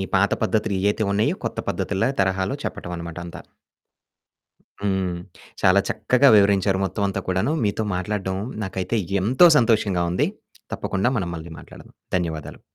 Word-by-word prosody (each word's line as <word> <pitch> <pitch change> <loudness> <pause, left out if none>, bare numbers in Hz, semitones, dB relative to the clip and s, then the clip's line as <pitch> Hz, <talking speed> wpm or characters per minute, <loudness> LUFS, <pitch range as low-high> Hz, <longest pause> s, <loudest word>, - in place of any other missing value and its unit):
పాత - - +3
పద్ధతులు - - 0
ఏయైతే 105 +2 +1
ఉన్నాయో 105 +2 +1
కొత్త - - -3
పద్ధతుల్లా 100 +5 -1
తరహాలో 95 +5 0
చెప్పటమనమాట 85 -1 -6
అంతా. 85 - -9 1.4
హ్మ్. 95 -3 0 0.5
చాలా 95 +2 +5
చక్కగా 135 +2 +3
వివరించారు 100 -1 +3
మొత్తం 100 +1 -3
అంతా 100 0 -3
కూడాను. 95 +10 0
మీతో 105 +1 0
మాట్లాడడం 95 0 -2 0.3
నాకైతే 95 +3 -2 0.2
ఎంతో 130 - +6
సంతోషంగా 105 -7 +2
ఉంది. 90 - +1 0.5
తప్పకుండా 100 +6 -1
మనం 90 -4 -2
మళ్ళీ 80 0 -8
మాట్లాడదాం. - - -14 0.2
ధన్యవాదాలు. 80 -3 -5
95 Hz, 125 wpm, -23 LUFS, 90-105 Hz, 1.4 s, ఎంతో